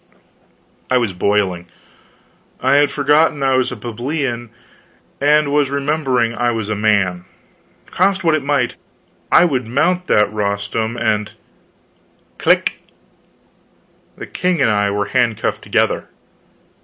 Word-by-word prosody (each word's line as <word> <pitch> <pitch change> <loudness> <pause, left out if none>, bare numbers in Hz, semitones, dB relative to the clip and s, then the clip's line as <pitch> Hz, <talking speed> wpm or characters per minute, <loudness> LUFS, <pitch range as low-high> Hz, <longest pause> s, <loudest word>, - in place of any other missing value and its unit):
I 130 - +3
was 115 -6 -1
boiling. 95 -2 0 0.9
I 140 - +3
had 145 0 +4
forgotten 145 +1 +2
I 135 -1 +2
was 130 0 +1
a - - -5
plebeian, 120 +2 -4 0.7
I 150 +2 +4
was 145 -1 0
remembering 140 -4 0
I 120 +1 0
was 110 -3 -3
a 105 - -1
man. 100 -4 +1 0.6
Cost 190 +1 0
what 165 -2 +3
it 155 -2 0
might, 140 -3 0 0.5
I - - +6
would 130 -8 -1
mount 175 +9 0
that 105 0 +2
rostrum 105 +2 -2
and 110 -2 -1 1.1
Click! - - +2 1.4
the - - -7
king 180 -2 -1
and 125 -5 +3
I 105 -1 +1
were 100 0 -1
handcuffed 115 0 0
together! - - 0
120 Hz, 125 wpm, -18 LUFS, 105-145 Hz, 1.4 s, I